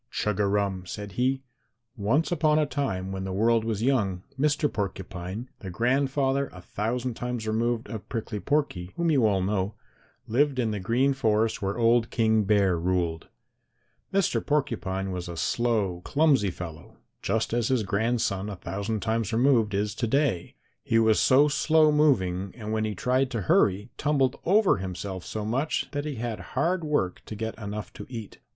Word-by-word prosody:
"Chug 105 Hz, -2 st, -1 dB
a 100 Hz, -, +3 dB
rum!" 100 Hz, -2 st, -1 dB
said 100 Hz, +2 st, -6 dB
he. 130 Hz, +6 st, 0 dB, 0.5 s
"Once 115 Hz, -, +1 dB
upon 155 Hz, -2 st, +3 dB
a 155 Hz, -, +3 dB
time 95 Hz, -11 st, -2 dB
when 95 Hz, 0 st, -4 dB
the 95 Hz, -, -4 dB
world 115 Hz, +4 st, +2 dB
was 110 Hz, -1 st, -2 dB
young, 100 Hz, -9 st, +1 dB
Mr. 150 Hz, +2 st, +2 dB
Porcupine, 95 Hz, 0 st, -5 dB
the 95 Hz, -, -7 dB
grandfather 135 Hz, +5 st, +1 dB
a 90 Hz, -, -11 dB
thousand 120 Hz, +7 st, -3 dB
times 120 Hz, -1 st, -4 dB
removed 115 Hz, +1 st, 0 dB
of 110 Hz, -3 st, -7 dB
Prickly 110 Hz, -2 st, -3 dB
Porky, 120 Hz, -11 st, -1 dB
whom 170 Hz, -1 st, +1 dB
you 130 Hz, -7 st, +4 dB
all 95 Hz, -3 st, +1 dB
know, 100 Hz, +1 st, -1 dB, 0.5 s
lived 135 Hz, +4 st, +1 dB
in 115 Hz, -3 st, +1 dB
the 105 Hz, -, -3 dB
Green 120 Hz, +8 st, +2 dB
Forest 110 Hz, -4 st, +1 dB
where 100 Hz, +2 st, -2 dB
old 115 Hz, 0 st, +3 dB
King 110 Hz, -2 st, +2 dB
Bear 100 Hz, -4 st, +3 dB
ruled. 85 Hz, -2 st, -1 dB, 0.8 s
Mr. 195 Hz, -3 st, +1 dB
Porcupine 100 Hz, -10 st, -1 dB
was 90 Hz, -1 st, -5 dB
a 85 Hz, -, -6 dB
slow 105 Hz, -5 st, 0 dB
clumsy 140 Hz, -9 st, +3 dB
fellow, 85 Hz, -3 st, -9 dB, 0.2 s
just 110 Hz, 0 st, -1 dB
as 120 Hz, -1 st, +1 dB
his 130 Hz, -4 st, +1 dB
grandson 105 Hz, -1 st, 0 dB
a 100 Hz, -, -5 dB
thousand 100 Hz, +3 st, -3 dB
times 110 Hz, -1 st, -1 dB
removed 115 Hz, -3 st, +3 dB
is 105 Hz, +1 st, 0 dB
to 120 Hz, -, -2 dB
day. 135 Hz, -, 0 dB, 0.3 s
He 115 Hz, -, +1 dB
was 110 Hz, -1 st, +4 dB
so 140 Hz, +3 st, +5 dB
slow 155 Hz, +1 st, +4 dB
moving, 100 Hz, -11 st, +2 dB
and 110 Hz, -2 st, -5 dB
when 110 Hz, 0 st, 0 dB
he 105 Hz, -1 st, -3 dB
tried 130 Hz, 0 st, +1 dB
to 115 Hz, -4 st, -3 dB
hurry 100 Hz, +4 st, +2 dB
tumbled 140 Hz, -3 st, +2 dB
over 200 Hz, -, +4 dB
himself 95 Hz, 0 st, -5 dB
so 110 Hz, -1 st, -4 dB
much, 130 Hz, +8 st, -1 dB
that 145 Hz, 0 st, -3 dB
he 150 Hz, -2 st, -3 dB
had 115 Hz, -3 st, -4 dB, 0.2 s
hard 170 Hz, +5 st, +1 dB
work 145 Hz, -13 st, -1 dB
to 110 Hz, -, -6 dB
get 110 Hz, +1 st, -3 dB
enough 105 Hz, 0 st, -6 dB
to -, -, -9 dB
eat. 115 Hz, -5 st, -8 dB
110 Hz, 175 wpm, -27 LUFS, 100-135 Hz, 0.8 s, so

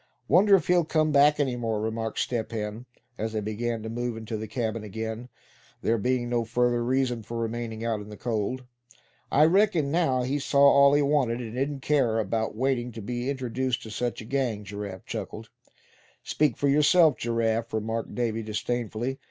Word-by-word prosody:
"Wonder 195 Hz, +6 st, +6 dB
if 190 Hz, -, +1 dB
he'll 180 Hz, -2 st, +3 dB
come 155 Hz, -1 st, +1 dB
back 145 Hz, +1 st, +5 dB
any 135 Hz, -4 st, +1 dB
more?" 115 Hz, -3 st, -2 dB
remarked 110 Hz, +1 st, -3 dB
Step 120 Hz, -2 st, -2 dB
Hen, 110 Hz, +2 st, -5 dB, 0.3 s
as 110 Hz, +1 st, -2 dB
they 110 Hz, -, 0 dB
began 110 Hz, +2 st, -3 dB
to -, -, -5 dB
move 120 Hz, 0 st, -3 dB
into 110 Hz, 0 st, -5 dB
the 110 Hz, 0 st, -4 dB
cabin 110 Hz, -1 st, -3 dB
again, 110 Hz, +3 st, -5 dB, 0.5 s
there 115 Hz, 0 st, +2 dB
being 125 Hz, +2 st, 0 dB
no 120 Hz, -1 st, 0 dB
further 120 Hz, +1 st, +1 dB
reason 125 Hz, -1 st, 0 dB
for 115 Hz, +2 st, -6 dB
remaining 115 Hz, 0 st, -3 dB
out 110 Hz, -2 st, -1 dB
in 105 Hz, -, -10 dB
the 105 Hz, -, -9 dB
cold. 120 Hz, +2 st, -2 dB, 0.7 s
"I 150 Hz, +2 st, +5 dB
reckon 175 Hz, -5 st, +3 dB
now, 135 Hz, -7 st, +2 dB
he 135 Hz, +3 st, -1 dB
saw 140 Hz, +1 st, 0 dB
all 140 Hz, 0 st, +7 dB
he 145 Hz, -, +3 dB
wanted, 140 Hz, -5 st, +1 dB
and 115 Hz, -3 st, -6 dB
didn't 135 Hz, +2 st, -2 dB
care 130 Hz, -7 st, +2 dB
about 110 Hz, +1 st, -1 dB
waiting 125 Hz, 0 st, 0 dB
to 115 Hz, -, -7 dB
be 120 Hz, +4 st, -3 dB
introduced 130 Hz, -1 st, -2 dB
to 110 Hz, -, -9 dB
such 120 Hz, +3 st, -3 dB
a -, -, -9 dB
gang," 120 Hz, -5 st, -1 dB
Giraffe 100 Hz, -2 st, -7 dB
chuckled. -, -, -6 dB, 0.7 s
"Speak 145 Hz, -6 st, +1 dB
for 145 Hz, -, +1 dB
yourself, 150 Hz, +2 st, +5 dB
Giraffe," 115 Hz, 0 st, -1 dB
remarked 110 Hz, +1 st, -3 dB
Davy, 115 Hz, -2 st, -1 dB
disdainfully. 120 Hz, +3 st, -3 dB
120 Hz, 185 wpm, -27 LUFS, 110-135 Hz, 0.7 s, all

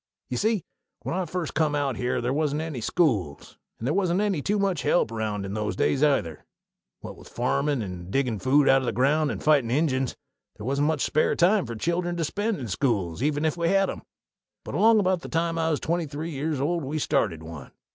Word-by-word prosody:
Ye 125 Hz, -, -1 dB
see, 215 Hz, -, +1 dB, 0.4 s
when -, -, -3 dB
I 185 Hz, -1 st, -1 dB
first 175 Hz, 0 st, -4 dB
come 155 Hz, -1 st, +1 dB
out 140 Hz, -3 st, 0 dB
here 125 Hz, +2 st, -1 dB
they 120 Hz, +1 st, -1 dB
wasn't 150 Hz, +1 st, 0 dB
any 155 Hz, -7 st, -5 dB
schools, 110 Hz, -, -1 dB, 0.2 s
and 115 Hz, -, -4 dB
they -, -, +2 dB
wasn't 185 Hz, 0 st, +1 dB
any 200 Hz, -7 st, 0 dB
too 205 Hz, +8 st, 0 dB
much 195 Hz, -6 st, 0 dB
help 150 Hz, -5 st, +2 dB
around 110 Hz, -3 st, -3 dB
in 95 Hz, -, -5 dB
those 105 Hz, -1 st, -2 dB
days, 135 Hz, -, +1 dB
either. 115 Hz, -, +1 dB, 0.6 s
What -, -, -8 dB
with -, -, -14 dB
farmin', 140 Hz, +1 st, 0 dB
and 90 Hz, -2 st, -7 dB
diggin' 125 Hz, -2 st, 0 dB
food 140 Hz, +4 st, +3 dB
out 135 Hz, 0 st, +5 dB
o' -, -, -4 dB
the -, -, -1 dB
ground, 145 Hz, +4 st, +2 dB
and -, -, -5 dB
fightin' 145 Hz, -6 st, +3 dB
Injuns, 130 Hz, -1 st, 0 dB, 0.4 s
they -, -, -9 dB
wasn't 140 Hz, +4 st, +1 dB
much 155 Hz, -3 st, 0 dB
spare 155 Hz, -, +2 dB
time 185 Hz, -, +3 dB
for 115 Hz, -, -5 dB
children 175 Hz, +7 st, -1 dB
to 165 Hz, -, 0 dB
spend 205 Hz, +5 st, -1 dB
in 125 Hz, -, -5 dB
schools, 100 Hz, -, -1 dB
even 150 Hz, +2 st, 0 dB
if 160 Hz, -, +1 dB
we'd 170 Hz, -1 st, 0 dB
a 195 Hz, -, +4 dB
had 195 Hz, 0 st, +2 dB
'em. -, -, -8 dB, 0.6 s
But -, -, -6 dB
along 225 Hz, 0 st, +5 dB
about 185 Hz, -3 st, +1 dB
the -, -, -8 dB
time 165 Hz, 0 st, 0 dB
I 160 Hz, 0 st, +1 dB
was 155 Hz, -, 0 dB
twenty 170 Hz, 0 st, -1 dB
three 155 Hz, +4 st, -5 dB
years 150 Hz, 0 st, -2 dB
old 165 Hz, +4 st, 0 dB
we 145 Hz, +4 st, -3 dB
started 85 Hz, -, 0 dB
one. 80 Hz, -4 st, -9 dB
145 Hz, 225 wpm, -26 LUFS, 125-170 Hz, 0.6 s, out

